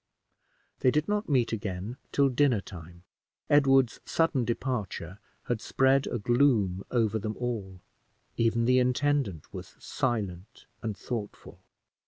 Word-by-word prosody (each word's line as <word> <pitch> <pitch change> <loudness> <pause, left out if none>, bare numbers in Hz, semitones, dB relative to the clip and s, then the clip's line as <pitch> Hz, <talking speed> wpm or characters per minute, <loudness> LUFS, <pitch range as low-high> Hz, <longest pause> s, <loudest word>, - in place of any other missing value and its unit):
They 130 - +4
did 150 +3 +1
not 210 -2 -1
meet 125 -5 +2
again 100 +2 -4
till 140 -1 +3
dinner 130 -3 +3
time. 85 -2 -11 0.5
Edward's 135 -4 +4
sudden 160 -7 +1
departure 105 -7 -3 0.2
had 120 -3 -2
spread 135 +3 +2
a - - -2
gloom 110 -5 +2
over 110 -3 +1
them 110 +1 -4
all 105 -7 -4 0.5
even 115 0 +1
the 125 +1 +4
intendant 125 - 0
was - - -9
silent 100 -7 -3 0.2
and 110 -3 -4
thoughtful. 110 0 -6
120 Hz, 125 wpm, -28 LUFS, 100-135 Hz, 0.5 s, They